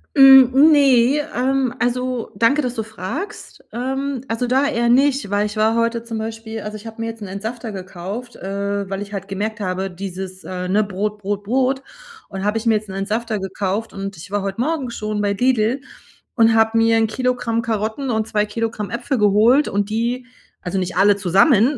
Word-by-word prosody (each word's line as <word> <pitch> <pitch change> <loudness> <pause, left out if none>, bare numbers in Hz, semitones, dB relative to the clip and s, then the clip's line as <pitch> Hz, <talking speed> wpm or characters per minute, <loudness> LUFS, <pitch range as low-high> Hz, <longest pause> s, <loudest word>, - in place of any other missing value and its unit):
Hm, 270 +1 +8
ne, 275 -1 +4 0.2
ähm, 260 -1 +1
also 250 0 -1
danke, 275 +6 +3
dass 250 -1 -2
du 225 - -3
fragst. 220 - -7
Ähm, 265 +2 -3
also 230 +2 -1
da 265 +3 +2
eher 235 -5 +1
nicht, 270 -1 +3
weil 205 +1 +1
ich 210 +1 -5
war 220 +1 +2
heute 230 0 0
zum 230 -1 -5
Beispiel 225 0 -5
also 210 0 -6
ich 215 +2 -11
habe 225 0 -10
mir 230 - -2
jetzt 225 0 -9
'n 205 - -6
Entsafter 220 +4 -5
gekauft, 195 +5 -7
äh, 200 0 -3
weil 195 +1 -3
ich 205 0 -12
halt 195 -1 -5
gemerkt 210 +3 -3
habe, 190 -1 -2
dieses, 185 0 -7
äh, 180 -1 -5
ne, 205 +4 +2
Brot, 205 +1 -3
Brot, 205 0 -3
Brot 260 +4 0 0.4
und 190 -1 -6
habe 210 +2 +1
ich 225 - -4
mir 225 -1 +4
jetzt 210 -1 -3
'n 190 - -6
Entsafter 215 +3 -2
gekauft 195 +3 -3
und 195 -1 -6
ich 180 +5 -11
war 205 0 0
heute 195 +2 -4
Morgen 280 0 -1
schon 215 -2 -3
bei 205 -1 +1
Lidl 245 +2 +1 0.5
und 225 -1 +4
habe 225 0 +3
mir 225 0 +4
'n 225 - +3
Kilogramm 245 -1 -1
Karotten 225 +4 -2
und 220 -2 0
2 210 -1 +1
Kilogramm 220 -1 -3
Äpfel 245 +2 -2
geholt 215 +8 +4
und 205 +1 -1
die 240 +3 -1 0.4
also 180 +2 -3
nicht 185 -1 -2
alle 205 +1 +5
zusammen. 205 - +3
220 Hz, 200 wpm, -20 LUFS, 200-245 Hz, 0.5 s, Hm